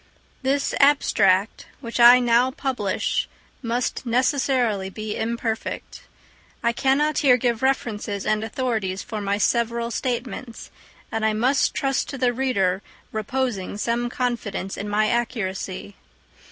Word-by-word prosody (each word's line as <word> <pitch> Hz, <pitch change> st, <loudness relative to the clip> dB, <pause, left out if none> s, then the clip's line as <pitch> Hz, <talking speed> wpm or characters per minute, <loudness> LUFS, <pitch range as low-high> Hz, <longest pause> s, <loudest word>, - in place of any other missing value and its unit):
This 275 Hz, +1 st, 0 dB
abstract, 215 Hz, -9 st, +3 dB
which 235 Hz, -2 st, -5 dB
I 240 Hz, +1 st, +9 dB
now 240 Hz, +1 st, +3 dB
publish, 250 Hz, -7 st, -1 dB, 0.3 s
must 240 Hz, 0 st, -2 dB
necessarily 250 Hz, -5 st, +1 dB
be 215 Hz, +2 st, -5 dB
imperfect. 230 Hz, 0 st, -4 dB, 0.6 s
I 235 Hz, -, +3 dB
cannot 285 Hz, +4 st, +2 dB
here 255 Hz, -4 st, +5 dB
give 240 Hz, -1 st, 0 dB
references 215 Hz, -6 st, -1 dB
and 215 Hz, 0 st, +1 dB
authorities 220 Hz, -5 st, -2 dB
for 215 Hz, -1 st, -5 dB
my 200 Hz, 0 st, 0 dB
several 235 Hz, +2 st, 0 dB
statements; 240 Hz, -1 st, -4 dB, 0.4 s
and 225 Hz, 0 st, -2 dB
I 220 Hz, 0 st, +2 dB
must 255 Hz, +6 st, +2 dB
trust 270 Hz, -1 st, 0 dB
to 275 Hz, -, -5 dB
the 250 Hz, -1 st, +1 dB
reader 200 Hz, -8 st, 0 dB, 0.3 s
reposing 220 Hz, -3 st, -2 dB
some 235 Hz, +2 st, -1 dB
confidence 240 Hz, -7 st, -3 dB
in 205 Hz, -, -5 dB
my 215 Hz, +1 st, +2 dB
accuracy. 205 Hz, -5 st, -2 dB
235 Hz, 125 wpm, -23 LUFS, 210-255 Hz, 0.6 s, I